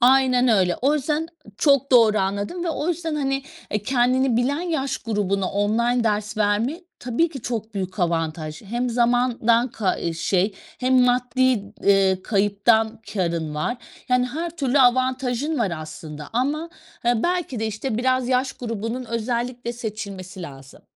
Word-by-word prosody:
Aynen 255 0 +5
öyle. 185 -5 +3
O 280 +4 +3
yüzden 300 +2 -1 0.3
Çok 280 -2 +3
doğru 225 -3 +6
anladım 200 - -2
ve - - -1
o 320 0 -2
yüzden, 330 -2 -2
hani, 275 -2 -1 0.4
kendini 255 0 +2
bilen 270 +6 +1
yaş 315 -6 -2
grubuna 200 -4 -1
online 230 +4 +1
ders 215 0 -1
vermek 220 - 0 0.2
tabii 250 +8 +1
ki 270 -7 -9
çok 220 -2 -4
büyük 190 +1 -4
avantaj. 165 -2 -2
Hem 240 +4 -2
zamandan 240 0 +2
kay 205 -5 -1
eee, 170 - 0
şey 185 +4 0 0.3
hem 255 0 +4
maddi, 250 -3 +2
ııı, 195 -2 +4
kayıptan 220 +2 +2
kârın 170 -5 -1
var. 155 +11 -1 0.3
Yani 250 0 +3
her 325 +7 -4
türlü 275 -2 +1
avantajın 255 +3 +2
var 205 -7 0
aslında 155 -1 -8
ama 295 +8 -1 0.3
belki 255 +2 0
de, 220 - 0
işte, 220 +2 -3
biraz 255 0 +1
yaş 255 +1 +1
grubunun 230 +1 -4
özellikle 235 +1 -2
seçilmesi 200 -5 -6
lazım. 135 -4 -11
235 Hz, 145 wpm, -23 LUFS, 200-260 Hz, 0.4 s, doğru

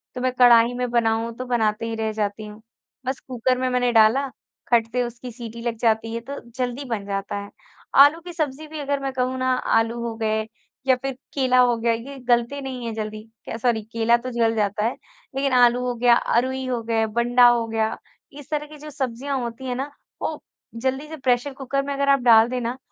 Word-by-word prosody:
तो 250 - -4
मैं 255 0 +1
कढ़ाई 240 -1 +7
में 250 0 -2
बनाऊँ 230 -1 +1
तो 255 - -5
बनाते 230 -2 0
ही 225 - -3
रह 220 0 -1
जाती 210 0 -3
हूँ। 210 +1 -11 0.4
बस 260 +1 -2
कुकर 255 0 0
में 255 0 0
मैंने 250 -1 +1
डाला, 225 +5 +5 0.4
खट 230 -2 +4
से 250 +1 +1
उसकी 240 +1 -7
सीटी 235 -1 -8
लग 235 -1 -3
जाती 225 -1 +1
है 230 - -2
तो 280 +4 -7 0.2
जल्दी 250 +1 -2
बन 225 -5 -3
जाता 200 0 -3
है। 200 - -11 0.5
आलू 290 +4 +8
की 350 +1 -9
सब्जी 310 -2 -3
भी 310 0 -7
अगर 285 0 -1
मैं 270 - -2
कहूँ 255 0 -1
ना 255 0 +1 0.3
आलू 230 +1 0
हो 230 -1 -3
गए, 220 -1 0 0.5
या 260 - +6
फिर 270 +2 -4 0.2
केला 255 -2 +3
हो 245 -1 +5
गया 230 0 +1
ये 270 +5 -6
गलते 240 +3 +2
नहीं 255 -3 -5
है 230 - -3
जल्दी, 215 -1 -5 0.2
क्या 225 - -5
सॉरी 230 -2 +1
केला 230 +1 +3
तो 255 +2 -6
जल 230 -1 +1
जाता 210 0 0
है 235 - +1 0.4
लेकिन 275 -1 0
आलू 245 0 +5
हो 245 - 0
गया 240 0 +5
अरूई 260 +3 0
हो 245 -2 -1
गया, 225 -1 +1
बंडा 240 +2 +4
हो 240 -1 +3
गया, 220 -1 -1 0.4
इस 290 -1 -12
तरह 300 -1 -2
की 305 0 -12
जो 300 +1 -10
सब्जियाँ 270 0 -3
होती 240 +1 -6
हैं 250 - -2
ना 270 +3 -4 0.3
वो 310 - -3 0.4
जल्दी 265 +3 -1
से 315 - -8
प्रेशर 260 0 0
कुकर 275 +1 -2
में 280 0 -3
अगर 280 0 0
आप 275 - +5
डाल 230 -2 +6
दे 250 0 -2
ना, 240 +2 -3
245 Hz, 225 wpm, -23 LUFS, 230-265 Hz, 0.5 s, आलू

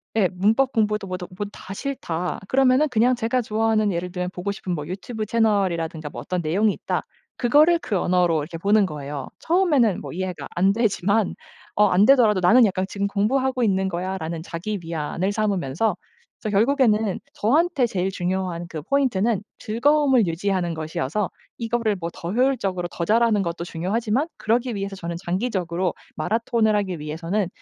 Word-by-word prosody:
예, 200 -5 +3
'문법 220 +9 +2
공부도 210 -2 0
뭐도 180 -1 -5
뭐 205 - -2
다 190 - -9
싫다.' 180 - -3
그러면은 265 +4 +4
그냥 250 -1 +3
제가 240 +2 0
좋아하는 220 -1 +1
예를 180 +1 -3
들면 180 0 -2
보고 185 +3 -3
싶은 185 -2 -4
뭐 150 -3 -4
유튜브 215 +5 -5
채널이라든가 185 -8 0
뭐 - - -7
어떤 180 -1 -2
내용이 195 +7 +2
있다 - - -3 0.3
그거를 305 +8 +4
그 205 - -2
언어로 175 -2 +2
이렇게 165 +3 -6
보는 200 +3 +3
거예요. 145 -3 -6
처음에는 305 - +2
뭐 - - -7
이해가 185 0 -4
안 190 +3 +4
되지만 210 -2 +1 0.4
어 210 - +5
안 190 +3 +4
되더라도 225 -6 +5
'나는 230 +7 +6
약간 190 -2 0
지금 200 +1 -1
공부하고 250 +5 +1
있는 190 -2 +2
거야.'라는 175 -2 -3
자기 190 +5 -4
위안을 165 +3 -2
삼으면서. 205 -2 0 0.5
그래서 215 - -3
결국에는 225 -4 +3 0.2
저한테 295 +2 +2
제일 190 -2 -1
중요한 180 -2 -2
그 155 - -5
포인트는 235 - +1 0.2
즐거움을 260 - +2
유지하는 175 0 -1
것이어서 160 +4 -2 0.3
이거를 230 -2 0
뭐 170 -1 -3
더 170 - -6
효율적으로 215 -7 0
더 170 - -4
잘 230 +4 +3
하는 215 -4 +3
것도 170 -1 -3
중요하지만 215 - -1
그러기 235 +1 0
위해서 195 0 -4
저는 170 -1 -5
장기적으로 180 -3 -1 0.2
마라톤을 220 +4 +1
하기 190 -5 -1
위해서는 165 +6 -2
200 Hz, 400 characters per minute, -23 LUFS, 180-230 Hz, 0.5 s, 나는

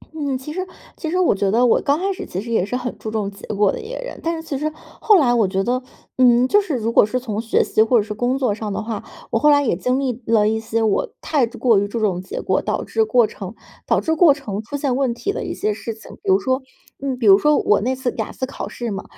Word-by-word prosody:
嗯， 280 -4 -2
其 300 +4 -8
实 370 +1 -3 0.3
其 320 - -5
实 365 - 0
我 360 - +4
觉 195 0 0
得 240 +4 +3
我 235 - +3
刚 285 0 +2
开 390 +1 0
始 - - -7
其 185 - -5
实 230 +3 -6
也 220 - +2
是 250 +4 -2
很 250 -1 -4
注 220 - -5
重 215 -2 -2
结 200 - -12
果 205 -2 +2
的 - - -5
一 440 - -9
个 - - -5
人， - - -8
但 330 +1 0
是 320 0 -8
其 280 -4 -2
实 310 +2 -2
后 410 +5 +2
来 245 -5 +3
我 225 -4 +3
觉 190 +1 -1
得， 250 +4 0 0.4
嗯， 245 -1 +5
就 410 +9 +4
是 340 -8 -3
如 225 0 -1
果 - - +6
是 255 +4 -2
从 220 -4 -3
学 225 - +2
习 220 - +1
或 230 +2 +4
者 210 - +3
是 210 - -5
工 245 +5 0
作 250 -6 +1
上 215 -1 -5
的 - - -3
话， 220 -2 -5 0.3
我 225 - +1
后 300 - +4
来 285 0 +5
也 235 - +1
经 250 +9 0
历 255 -3 -2
了 220 -2 +3
一 220 +1 +1
些 225 0 -1
我 220 - +1
太 280 -6 +1
之 230 - -12
过 230 -6 +4
于 205 - -1
注 230 +3 -4
重 190 -4 0
结 185 - -6
果， - - +1
导 - - -2
致 445 -1 0
过 245 - +4
程 200 0 -8 0.3
导 - - +3
致 320 - 0
过 315 -3 +6
程 215 -8 -5
出 285 +6 -5
现 275 -3 0
问 265 -3 +1
题 400 +12 -3
的 - - -4
一 - - -4
些 215 - -1
事 225 +1 -6
情。 220 - -14
比 - - -3
如 190 - +5
说 260 +4 0 0.4
嗯， 270 -2 -2
比 240 - -3
如 195 0 +9
说 300 +5 +3
我 210 - +3
那 260 +4 0
次 255 -1 -2
雅 220 - -3
思 260 - -3
考 270 - -6
试 240 -2 -5
嘛， 195 -1 -4
245 Hz, 315 characters per minute, -20 LUFS, 215-280 Hz, 0.4 s, 如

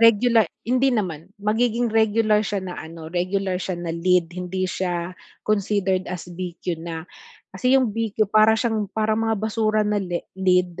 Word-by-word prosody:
regula 230 -1 +5 0.2
hindi 255 +3 +3
naman, 175 -6 -3
magiging 235 +2 +1
regular 220 -1 +3
siya 200 -2 -2
na 180 -1 -5
ano, 160 0 -9
regular 185 +1 0
siya 185 0 -3
na 175 -1 -4
lead 175 0 +2
hindi 180 +1 -3
siya 180 -1 -2 0.3
considered 200 -3 +1
as 180 -1 -5
BQ 175 -1 -4
na. 165 -1 -5 0.5
Kasi 250 +8 +2
'yong 255 -4 +2
BQ 220 -1 0
para 215 +1 +6
siyang 220 -4 0
parang 220 +1 0
mga 225 - +1
basura 215 0 +1
na 210 0 +1
le 175 -2 -4
lead, 180 -2 +2
195 Hz, 160 wpm, -23 LUFS, 180-220 Hz, 0.5 s, para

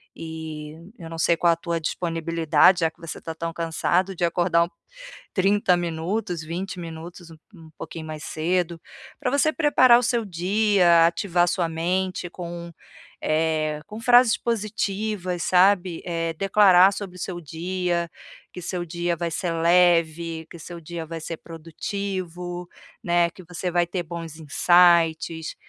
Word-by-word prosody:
e 160 -2 -7 0.3
eu 165 -1 -9
não 165 - -7
sei 170 +1 +3
qual 170 -1 +4
a - - -2
tua 170 -1 -3
disponibilidade, 165 +1 +2
já 160 -1 +2
que 170 - -34
você 165 - -7
está 165 - -6
tão 165 0 -4
cansado, 175 +3 0
de 175 - 0
acordar 170 0 +2 0.6
30 195 -2 +3
minutos, 175 +2 -3
20 180 +3 -5
minutos, 170 +1 -9
um 160 - -13 0.2
um 160 -2 -14
pouquinho 160 -1 -7
mais 155 -1 -7
cedo, 170 +1 -1 0.4
pra 250 - -1
você 310 +2 +2
preparar 255 -6 +5
o - - -3
seu 235 -1 0
dia, 185 -2 +3
ativar 175 0 +1
sua 175 -1 0
mente 180 +3 -2
com, 170 -1 -7 0.5
eh, 155 -1 0
com 215 +1 -8
frases 245 -1 +6
positivas, 210 -4 -2
sabe, 185 -1 +3
eh, 165 -1 -2
declarar 195 0 +5
sobre 190 -2 -7
o - - -11
seu 175 0 -4
dia, 170 +2 -2 0.4
que 180 - -8
seu 175 0 -3
dia 170 +1 -2
vai 170 -1 -2
ser 175 +2 -2
leve, 165 -1 +2
que - - -9
seu 170 +1 -9
dia 165 0 -6
vai 165 0 -7
ser 165 0 -5
produtivo, 175 +1 -6 0.4
né, 170 0 +2
que 185 - -14
você 180 +2 -4
vai 175 0 +2
ter 180 0 -3
bons 165 -1 -7
insights, 165 0 +3
175 Hz, 150 wpm, -24 LUFS, 165-185 Hz, 0.6 s, frases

